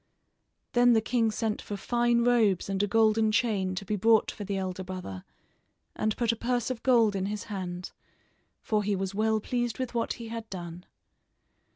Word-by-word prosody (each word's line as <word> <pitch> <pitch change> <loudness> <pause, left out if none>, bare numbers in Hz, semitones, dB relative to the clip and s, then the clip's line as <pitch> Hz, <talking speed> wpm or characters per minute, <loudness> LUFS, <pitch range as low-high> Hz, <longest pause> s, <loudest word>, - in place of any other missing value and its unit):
Then 245 -1 +5
the 225 - +5
king 225 0 +1
sent 215 0 -2
for 205 - -6
fine 240 +2 +1
robes 225 -7 +3
and 195 0 0
a 205 - +1
golden 220 0 +3
chain 210 -5 +1
to 195 - -5
be 210 - -1
brought 220 +2 +3
for 210 - -7
the 200 0 -3
elder 190 0 -3
brother, 180 - -7 0.7
and 215 0 -1
put 235 -2 +2
a - - -2
purse 245 +1 -1
of 245 - -5
gold 230 -5 +4
in 190 0 -1
his 210 0 -4
hand, 180 -2 -5 0.7
for 215 -1 +1
he 205 0 0
was 190 0 -3
well 220 +1 +1
pleased 240 +1 -2
with 255 -2 -4
what 235 -1 -1
he 230 -2 -8
had 225 -1 -6
done. 175 -2 -8
215 Hz, 190 wpm, -28 LUFS, 195-235 Hz, 0.7 s, Then